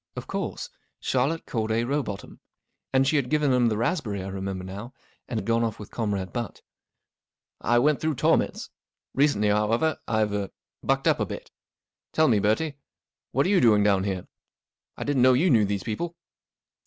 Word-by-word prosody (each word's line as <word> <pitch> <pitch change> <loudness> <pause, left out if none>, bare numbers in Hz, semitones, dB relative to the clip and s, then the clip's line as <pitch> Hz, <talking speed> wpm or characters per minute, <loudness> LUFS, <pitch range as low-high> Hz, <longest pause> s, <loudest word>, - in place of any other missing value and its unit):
Of - - -6
course! - - -4 0.3
Charlotte 135 +6 0
Corday 110 0 0
Row 140 +5 0
botham. 100 -6 -7 0.5
And 135 0 +3
she 155 - +3
had 130 -3 0
given 150 -3 +2
him 125 -1 +4
the 110 -2 0
raspberry, 110 - -1
I 95 - -5
remembered 95 -1 -4
now, 105 +7 -8 0.3
and 110 -3 -3
gone 115 0 +2
off 115 -2 -2
with 105 - -10
Comrade 100 -5 -2
Butt. 120 -3 -5 1.0
44 - - -5
I 120 - +5
went 145 +4 +3
through 155 -1 0
torments. - - +1 0.4
Recently, 130 -7 +3
however, 115 +9 +1
I've—er—bucked 105 +3 -1
up - - +3
a - - +1
bit. - - -8 0.6
Tell 155 0 +4
me, 110 -5 +4
Bertie, 135 +9 0 0.5
what 135 +3 +2
are - - +1
you 200 -2 +4
doing 105 -4 +5
down 100 -2 +3
here? 95 -2 -3 0.7
I - - -3
didn't 145 -3 +1
know 130 +1 +7
you 155 +8 +3
knew 110 -4 +5
these 100 -1 -2
people." 165 +10 -3
115 Hz, 175 wpm, -26 LUFS, 105-135 Hz, 1.0 s, know